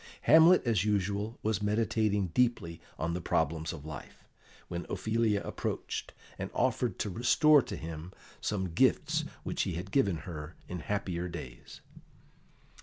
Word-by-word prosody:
Hamlet, 160 +3 +7
as 110 -6 +2
usual, 105 +2 -1
was 110 -1 0
meditating 105 -2 +1
deeply 110 -10 +1 0.2
on 85 +1 -1
the 90 - -3
problems 80 -1 0
of 75 -3 -9
life, 75 -4 -9 0.4
when 85 0 -5
Ophelia 110 -2 0
approached, - - -4 0.3
and - - -3
offered - - +1
to 105 - -2
restore 145 - +5
to - - -6
him 80 +1 -7 0.3
some 95 -5 -2
gifts - - +2 0.2
which - - -2
he 90 - -1
had 90 +3 -6
given 100 -10 +3
her 80 -1 -7
in 90 - -5
happier 90 -1 -2
days. 65 -8 -9
95 Hz, 140 wpm, -31 LUFS, 85-110 Hz, 0.4 s, Hamlet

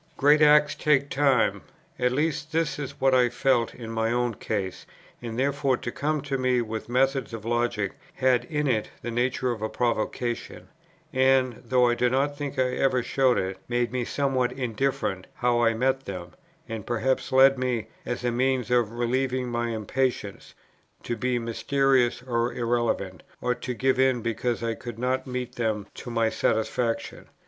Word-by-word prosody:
Great 150 +2 +5
acts 150 0 +6
take 140 -2 +2
time. 130 -8 +2 0.4
At 125 0 +2
least 150 +2 -1
this 165 -1 0
is 140 0 -6
what 135 0 +3
I 125 -1 +4
felt 120 -1 +1
in 115 -2 -7
my 115 0 0
own 120 0 0
case; 100 -3 -4 0.3
and 115 -1 -5
therefore 140 0 +1
to 120 -2 -5
come 150 +3 -1
to 135 -1 -3
me 130 -1 +2
with 110 -1 -4
methods 130 -1 +1
of 110 -1 -9
logic 120 -4 0 0.2
had 125 -2 +2
in 150 +1 -2
it 115 -6 0
the 120 - -3
nature 125 +2 0
of 115 -3 -5
a 110 - -1
provocation, 120 0 -2 0.4
and, 130 -2 +3
though 125 +1 +3
I 120 - +3
do 125 +1 +2
not 140 +3 +1
think 145 -1 -5
I 130 -1 +2
ever 130 -1 +1
showed 130 -1 +2
it, 95 0 -2
made 120 -1 0
me 125 -1 -1
somewhat 130 -1 0
indifferent 125 -6 -2
how 120 -1 +1
I 115 -1 +3
met 130 +3 0
them, 90 -2 -6 0.4
and 110 -3 -5
perhaps 120 +4 -1
led 135 0 +6
me, 125 -3 -1 0.2
as 120 - -4
a 120 - +1
means 125 -1 0
of 120 -3 +2
relieving 125 +1 -1
my 120 0 -1
impatience, 115 -1 -2 0.5
to 120 - -2
be 125 +2 0
mysterious 125 +1 +1
or 120 -1 0
irrelevant, 115 -6 -1 0.2
or 125 - 0
to 125 0 -5
give 130 +3 +1
in 130 -3 +3
because 115 0 -1
I 115 0 0
could 120 0 -8
not 130 +2 -1
meet 125 -1 -4
them 110 -4 -1
to - - -8
my 115 -1 +1
satisfaction. 115 +1 -1
125 Hz, 175 wpm, -26 LUFS, 115-130 Hz, 0.5 s, acts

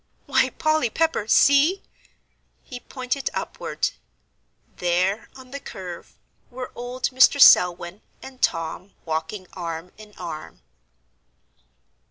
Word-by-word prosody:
"Why, - - +2
Polly 310 -6 +1
Pepper, 320 -5 0
see!" 285 - +4 0.8
He 250 - -9
pointed 255 +2 -3
upward. - - -3 0.9
There, 180 +4 0
on 260 -1 -14
the 280 - -5
curve, 180 -9 -9 0.3
were 255 +1 -7
old 245 +1 -3
Mr. 260 +3 +5
Selwyn 180 -4 +6 0.2
and 260 -1 -12
Tom 165 +4 -2
walking 160 +4 -3
arm 170 0 -6
in 210 -1 -14
arm. 155 - -8
215 Hz, 105 wpm, -23 LUFS, 175-260 Hz, 0.9 s, Selwyn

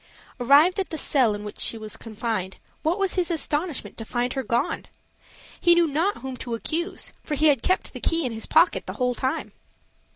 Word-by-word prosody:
Arrived 295 - +5
at 385 - -1
the 320 - -4
cell 250 -8 +2
in 205 - -7
which 210 - -8
she 230 - +3
was 215 -1 -5
confined, 220 -4 -4 0.2
what 325 +3 +1
was 390 -2 +1
his 360 -2 +1
astonishment 315 -1 -2
to - - -4
find 245 +2 -1
her 270 - -1
gone! 235 -2 -1 0.7
He 345 -1 +5
knew 345 0 +5
not 330 +7 0
whom 265 -1 -4
to 240 -2 -4
accuse, 335 - -2
for 300 - -2
he 305 +2 +4
had 275 -5 +3
kept 370 - 0
the - - -6
key 330 -2 +1
in 250 - -1
his 225 0 -6
pocket 330 +3 +3
the - - -4
whole 250 -1 0
time. 260 +2 -2
275 Hz, 205 wpm, -25 LUFS, 235-335 Hz, 0.7 s, Arrived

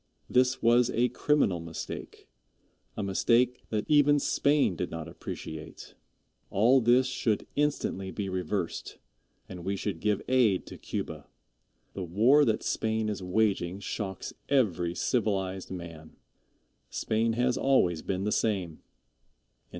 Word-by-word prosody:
This 125 0 +2
was 120 +1 +5
a 120 +2 +1
criminal 125 - +1
mistake 80 -1 -7 0.7
a 105 - -2
mistake 120 +6 +2
that 105 -1 -1
even 145 -1 +5
Spain 140 -6 +2
did 90 - -3
not 80 0 -6
appreciate. 80 -1 -8 0.6
All 120 +7 +4
this 120 +3 +4
should 125 -4 -1
instantly 145 -10 -1
be 100 +1 -4
reversed, 95 -1 -3 0.5
and 90 -2 -9
we 100 +2 -1
should 100 +1 -3
give 105 -2 0
aid 120 -8 +3
to - - -10
Cuba. - - -5 0.7
The 95 - -5
war 115 - +4
that 110 -2 0
Spain 110 -1 -1
is 100 -2 -4
waging 95 -1 0
shocks 95 -1 -5 0.2
every 90 -11 +1
civilized 95 -6 -1
man. 85 -3 -9 0.7
Spain 115 +1 0
has 125 +2 +1
always 90 -12 +2
been 95 0 -2
the 105 - -1
same. 95 -9 -1
105 Hz, 125 wpm, -29 LUFS, 90-125 Hz, 0.7 s, was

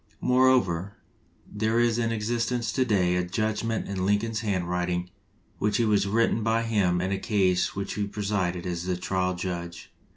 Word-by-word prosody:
Moreover, 125 -8 +2 0.5
there 110 +2 0
is 120 -1 +2
in 115 -1 0
existence 115 +2 -1
to 130 - +1
day 95 -7 +2
a 90 - +1
judgment 110 +4 -2
in 95 -2 -3
Lincoln's 105 +3 +1
handwriting 90 -3 -1 0.5
which 105 -1 +1
was 105 -4 +2
written 115 +2 +2
by 115 +1 +1
him 100 -6 +1
in 95 +1 -1
a 100 - -1
case 95 -4 +2
in - - -10
which 100 0 -4
he 105 -1 -2
presided 100 -4 -2
as 85 -1 -3
the 90 -1 -1
trial 90 0 -1
judge. 85 -7 -6
100 Hz, 165 wpm, -26 LUFS, 90-115 Hz, 0.5 s, Moreover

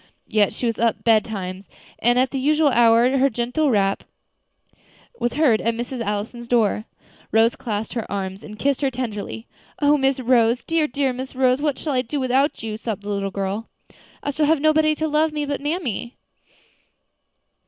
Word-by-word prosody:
Yet 210 -2 +2
she - - -5
was 230 -2 -1
up 230 -1 +1
betimes, 200 -4 0 0.3
and 240 +2 +3
at 255 +1 +2
the 270 - -2
usual 300 +2 +3
hour 240 +1 +4
her 275 +1 +4
gentle 250 +5 0
rap 195 -4 +1 1.2
was 240 - -1
heard 270 -7 +3
at 230 0 0
Miss 240 +3 -5
Allison's 230 0 -4
door. 220 -3 +1 0.5
Rose 225 +1 +4
clasped 215 -2 -4
her 240 - -2
in - - -9
her - - -13
arms 195 0 -4
and 210 0 -10
kissed 280 +4 0
her 275 - +2
tenderly. 230 -3 -5 0.3
"O 295 0 +3
Miss 270 0 +1
Rose! 240 -1 +2
dear, 325 -2 +1
dear 270 -1 -1
Miss 260 +1 -7
Rose, 255 +1 +2
what 295 -3 0
shall 300 - -3
I 255 - +2
do 270 +4 -4
without 265 +1 +1
you?" 215 -1 -4
sobbed 220 -3 -5
the 205 - -6
little 200 -1 -1
girl. 195 +3 -4 0.5
"I 285 - -1
shall 300 +1 +1
have 320 0 +3
nobody 310 +1 +3
to 315 +1 -1
love 310 +1 +2
me 300 -1 -2
now - - -8
but 280 - -4
mammy." 290 - -3
245 Hz, 190 wpm, -22 LUFS, 220-280 Hz, 1.2 s, hour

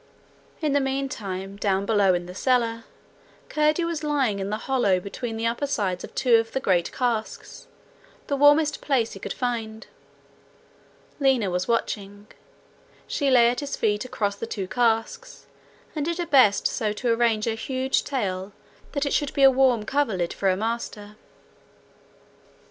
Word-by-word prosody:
In 300 -2 +1
the 285 - +4
meantime, 210 -8 -4
down 195 -1 0
below 200 -4 +3
in 175 0 -3
the 180 - -9
cellar, 230 0 0 0.6
Curdie 305 +2 +2
was 335 -2 -3
lying 270 -9 0
in 195 0 -3
the 215 - -2
hollow 245 -9 +2
between 225 +4 -6
the 225 - -2
upper 235 +5 -1
sides 190 -9 -2
of - - -10
two 240 -3 +4
of 225 0 -2
the 265 - 0
great 180 -8 +1
casks, 240 - -3 0.6
the 285 - -1
warmest 290 +2 +4
place 250 -6 0
he 195 - -9
could - - -6
find. 225 -3 -3 1.3
Lina 260 -8 +2
was 180 +1 -1
watching. 205 -3 -2 0.8
She 285 -2 -1
lay 240 -2 +6
at 245 - -2
his 285 -1 -4
feet, 210 -1 0
across 205 -5 -2
the 230 - -5
two 195 -4 -4
casks, 235 - -1 0.5
and 300 - -1
did 340 +2 -2
her 350 - -2
best 260 -10 +4
so 215 -4 0
to 235 +2 0
arrange 230 -2 +1
her 230 - 0
huge 260 +3 -1
tail 195 -7 -3 0.4
that 285 -1 0
it 280 - -1
should 290 -2 -1
be 275 - +2
a 270 - +9
warm 255 -4 +2
coverlid 220 -11 0
for 195 - 0
her 185 - +1
master. 215 -1 -4
230 Hz, 165 wpm, -24 LUFS, 205-270 Hz, 1.3 s, a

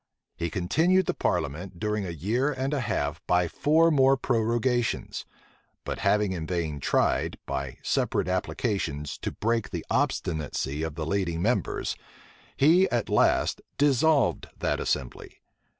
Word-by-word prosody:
He 85 0 -2
continued 165 - +2
the - - 0
parliament 85 +6 -2
during 105 -1 -1
a - - -4
year 110 - 0
and 135 +1 -2
a 145 - 0
half 80 - -2
by 90 -1 +3
four 160 - +3
more 135 -2 +4
prorogations; 120 0 0 0.6
but - - -4
having 105 -1 +2
in 85 -4 -4
vain 80 -5 -2
tried, - - +1
by 65 -1 -4
separate - - 0
applications, 90 - -2
to - - -3
break 115 +1 -1
the - - -5
obstinacy 75 -3 -1
of 80 -2 -3
the 80 -1 -3
leading 85 -2 -1
members, 120 +4 0 0.6
he 170 +7 +5
at 120 -2 -1
last - - +2 0.2
dissolved 145 +1 +3
that - - -1
assembly. 65 -3 -3
105 Hz, 135 wpm, -27 LUFS, 85-130 Hz, 0.6 s, he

